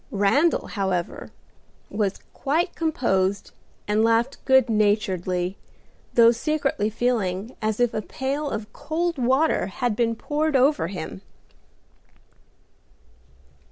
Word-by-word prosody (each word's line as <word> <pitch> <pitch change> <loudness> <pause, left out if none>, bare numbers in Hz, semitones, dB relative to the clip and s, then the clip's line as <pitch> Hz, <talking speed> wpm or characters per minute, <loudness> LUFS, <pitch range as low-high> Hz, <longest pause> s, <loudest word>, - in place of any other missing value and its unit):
Randal, 220 +12 +2
however, 190 -4 -3 0.6
was 205 -2 -1 0.2
quite 320 +6 0
composed 200 - 0 0.4
and 210 +1 +2
laughed 230 +4 +1
good 265 -2 +5
naturedly, 190 -4 0 0.6
though 235 -1 +7
secretly 275 -4 -1
feeling 220 -2 -1
as 215 0 -1
if 245 -1 +2
a 215 - -1
pail 275 +6 -3
of 215 -1 -5
cold 320 +2 -2
water 260 - +2
had 230 +3 -2
been 230 0 +1
poured 300 +5 -1
over 265 - +3
him. 160 - -6
230 Hz, 105 wpm, -24 LUFS, 200-275 Hz, 0.6 s, though